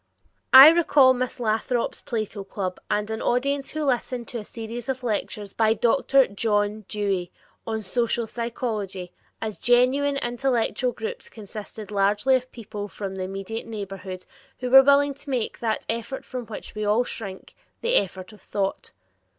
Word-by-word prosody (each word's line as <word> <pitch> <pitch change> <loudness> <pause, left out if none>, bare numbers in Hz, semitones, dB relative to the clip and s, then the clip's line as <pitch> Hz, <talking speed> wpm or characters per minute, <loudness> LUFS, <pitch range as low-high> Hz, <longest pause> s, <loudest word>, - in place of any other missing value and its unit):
I 265 +3 +12
recall 300 -6 +5
Miss 255 0 -3
Lathrop's 230 +1 -1
Plato 215 -3 -4
club 190 -2 -4
and 210 +1 -1
an 220 - -3
audience 275 +3 0
who 310 -1 -3
listened 245 -2 -1
to 240 - -4
a - - -7
series 230 +3 -7
of 260 -1 -2
lectures 210 -3 -3
by 220 0 +3
Dr. 270 +3 +3
John 205 0 -1
Dewey 195 -4 -2 0.4
on 220 -1 -2
"Social 235 +3 0
Psychology" 215 -6 -4 0.3
as 215 -2 -5
geniune 260 +4 +3
intellectual 245 0 0
groups 470 - -6
consisting 215 0 -9
largely 205 +6 +2
of 255 0 0
people 210 -3 -7
from 195 -1 -6
the 185 -1 -3
immediate 195 +4 -5
neighborhood, 195 -4 -7 0.3
who 250 -1 -3
were 270 0 +11
willing 280 +1 +4
to 280 +1 -13
make 250 -4 -2
"that 225 -2 -2
effort 235 +4 -4
from 250 -3 -6
which 220 - -8
we 215 -1 -4
all 210 +4 +3
shrink, 195 -6 -7 0.3
the 475 +1 0
effort 190 +1 0
of 210 - -16
thought." 195 0 -3
225 Hz, 160 wpm, -25 LUFS, 205-255 Hz, 0.4 s, I